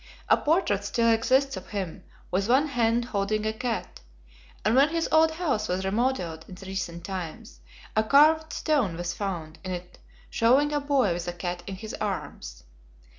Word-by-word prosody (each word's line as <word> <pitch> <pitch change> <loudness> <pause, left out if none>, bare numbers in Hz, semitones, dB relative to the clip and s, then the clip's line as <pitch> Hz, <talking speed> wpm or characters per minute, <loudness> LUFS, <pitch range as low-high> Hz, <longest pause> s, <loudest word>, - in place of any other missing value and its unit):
A - - +7
portrait 295 - +1
still 230 +3 +2
exists 260 +4 +2
of 185 - -9
him, 195 -5 -5 0.3
with 195 +4 0
one 275 +5 +4
hand 235 -2 +1
holding 215 -1 -1
a 220 - 0
cat, 235 0 -4 0.7
and 215 - +3
when 275 +3 +6
his 330 0 -1
old 320 0 +6
house 290 -11 -1
was 185 +1 -1
remodelled 195 -6 -1
in 185 - -10
recent 185 -3 -4
times, 190 +3 -6 0.4
a 215 - +3
carved 310 +6 +5
stone 255 - 0
was 175 0 -3
found 170 -6 -5
in 185 - -5
it 180 0 -6 0.3
showing 265 +6 +3
a 295 - +2
boy 275 -9 +2
with 175 0 -5
a 175 - -2
cat 175 0 -4
in 195 - -4
his 215 +3 -8
arms. 120 - -5
215 Hz, 175 wpm, -27 LUFS, 185-265 Hz, 0.7 s, A